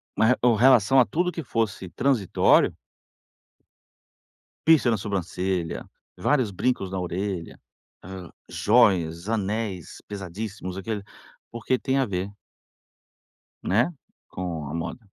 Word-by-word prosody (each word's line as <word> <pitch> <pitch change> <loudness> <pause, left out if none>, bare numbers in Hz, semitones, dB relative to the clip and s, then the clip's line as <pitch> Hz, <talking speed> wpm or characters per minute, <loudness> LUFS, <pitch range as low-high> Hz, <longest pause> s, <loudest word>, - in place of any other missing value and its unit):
ma 110 - +3
re 125 - +5
com 120 -2 +4
relação 130 +1 +5
a 125 - +6
tudo 180 +2 0
que 165 - -5
fosse 110 -6 -2
transitório 125 -7 +3 1.9
piercing 155 -7 +5
na 110 - +1
sobrancelha, 95 -3 -3 0.3
vários 130 -7 +1
brincos 100 0 -1
na 95 - -4
orelha, 90 0 -4 0.4
hã, 95 -1 -9 0.2
jóias, 95 -6 +3
anéis 105 -4 -3
pesadíssimos 95 -1 -6
aquilo, 105 +1 -4 0.5
porque 120 +2 -1
tem 135 +2 -1
a 135 - +3
ver 95 +1 -4 1.3
né, 115 - +2 0.4
com 85 -5 -4
a 75 - -6
moda. 85 +9 -4
100 Hz, 115 wpm, -25 LUFS, 90-120 Hz, 1.9 s, a